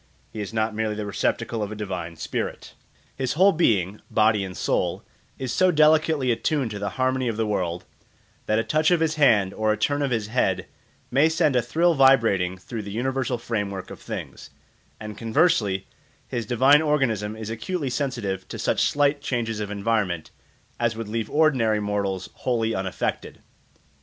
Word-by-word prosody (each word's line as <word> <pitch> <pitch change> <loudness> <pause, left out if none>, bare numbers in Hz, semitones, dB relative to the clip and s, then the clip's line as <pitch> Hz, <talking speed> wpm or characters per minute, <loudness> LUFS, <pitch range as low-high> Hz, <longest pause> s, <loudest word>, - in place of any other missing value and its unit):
He 110 - -7
is 100 - -5
not 110 0 0
merely 110 0 -1
the 105 0 -4
receptacle 110 +3 -1
of 105 0 -3
a - - -5
divine 90 -5 -5
spirit. - - -4 0.4
His 130 -2 -1
whole 190 +5 +5
being, 105 - +1
body 110 -2 +3
and 95 -1 -7
soul, - - -1 0.3
is 130 -2 -3
so 185 +8 +4
delicately 155 -4 +3
attuned 130 +1 0
to 100 - -5
the 100 0 -2
harmony 130 0 +1
of 115 -2 -2
the 115 - +1
world 90 -4 -2 0.6
that 110 - +2
a 115 - +2
touch 155 +4 +2
of 175 -2 +3
his 160 -1 +1
hand 105 -11 +3
or 110 0 +1
a 105 - 0
turn 145 +7 0
of 140 - +1
his 115 -4 -1
head 115 +4 0 0.5
may 145 +5 +4
send 155 -4 +2
a 125 - +4
thrill 165 +9 +2
vibrating 115 - +4
through 110 +4 -6
the 100 - -8
universal 130 +3 -1
framework 105 -5 -4
of - - -9
things; - - -7 0.5
and 105 -1 -8
conversely 115 - +2 0.4
his 115 -3 -4
divine 135 +6 +5
organism 120 -9 0
is 110 0 -6
acutely 140 +5 -3
sensitive 120 -9 -3
to - - -7
such - - 0
slight 145 0 +1
changes 115 -5 -2
of 105 -1 -3
environment 100 -5 -1 0.5
as 120 -1 +1
would 115 -2 -6
leave 110 -1 -3
ordinary 130 -9 +2
mortals 100 -2 -2
wholly 115 -3 -1
unaffected. 95 -3 -3
115 Hz, 175 wpm, -24 LUFS, 105-135 Hz, 0.6 s, whole